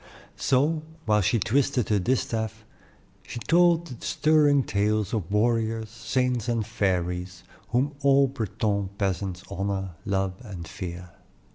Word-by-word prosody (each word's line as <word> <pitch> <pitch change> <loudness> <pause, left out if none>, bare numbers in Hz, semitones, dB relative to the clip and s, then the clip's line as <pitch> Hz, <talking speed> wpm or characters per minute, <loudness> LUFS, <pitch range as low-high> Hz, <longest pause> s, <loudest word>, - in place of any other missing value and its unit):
So, 150 +5 +2 0.2
while 105 -1 +3
she 105 +4 +2
twisted 125 +2 +1
her 105 -2 +3
distaff, 110 0 -1 0.6
she - - -8
told 170 +5 +3
the 125 -8 -10
stirring 150 -3 +3
tales 105 0 0
of 100 -7 -2
warriors, 110 0 +1
saints, 120 +1 -1
and 115 -3 0
fairies, 90 -2 -2 0.3
whom 130 +5 +1
all 140 0 +5
Breton 105 -5 -2
peasants 95 -2 -2
honor, 95 0 -2
love, 95 -1 0
and 95 -7 -8
fear. 90 -2 -7
110 Hz, 125 wpm, -26 LUFS, 95-125 Hz, 0.6 s, all